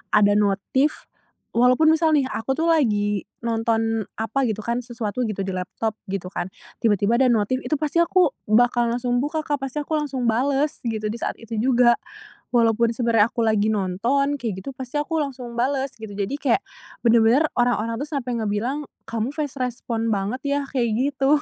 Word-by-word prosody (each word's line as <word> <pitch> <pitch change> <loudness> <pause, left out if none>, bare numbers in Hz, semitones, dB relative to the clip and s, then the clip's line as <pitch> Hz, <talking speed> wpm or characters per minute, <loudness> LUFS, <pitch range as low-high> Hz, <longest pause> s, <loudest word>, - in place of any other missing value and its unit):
ada 205 -1 +5
notif 210 +8 +1 0.5
walaupun 250 +6 +5
misal 320 0 +3
nih, 275 -3 +3
aku 265 +4 -2
tuh 325 +3 0
lagi 210 - +2 0.2
nonton 225 -1 0
apa 240 +5 -1
gitu 215 -2 -2
kan, 235 +2 -1
sesuatu 235 0 -3
gitu 210 -2 -3
di 190 - -3
laptop, 190 +4 -3
gitu 190 -1 -4
kan, 185 0 -5 0.3
tiba-tiba 215 +1 +3
ada 255 -2 +4
notif, 220 +4 +1
itu - - -1
pasti 305 +2 -1
aku 340 -1 +4 0.2
bakal 240 +2 +3
langsung 245 0 0
buka, 300 +4 -1
Kak, 290 -2 -1
pasti 295 +3 -3
aku 310 +1 -1
langsung 265 -5 -1
bales 275 +5 +1
gitu, 215 -2 -2
di 230 - -4
saat - - -2
itu 230 -1 -6
juga. 240 0 +4 0.6
Walaupun 230 0 +3
sebenernya 230 -3 +3
aku 235 - -2
lagi 215 -1 +2
nonton, 240 +10 0
kayak 210 -7 -4
gitu, 275 - -7
pasti 260 +3 -3
aku 325 +2 -2
langsung 255 -5 -4
bales, 270 +2 0
gitu. 220 -2 -8
Jadi 205 +8 -2
kayak 285 +6 +1 0.4
bener-bener 235 +6 +4
orang-orang 230 -2 +1
tuh 290 - -4
sampe 250 -3 -2
ngebilang, 230 +7 -2 0.2
"Kamu 230 +4 -2
fast 290 -3 -4
respond 230 -3 -2
banget, 205 +6 -2
ya," 285 0 +1
kayak 235 -4 0 0.2
gitu. 280 +2 +2
240 Hz, 175 wpm, -23 LUFS, 220-275 Hz, 0.6 s, ada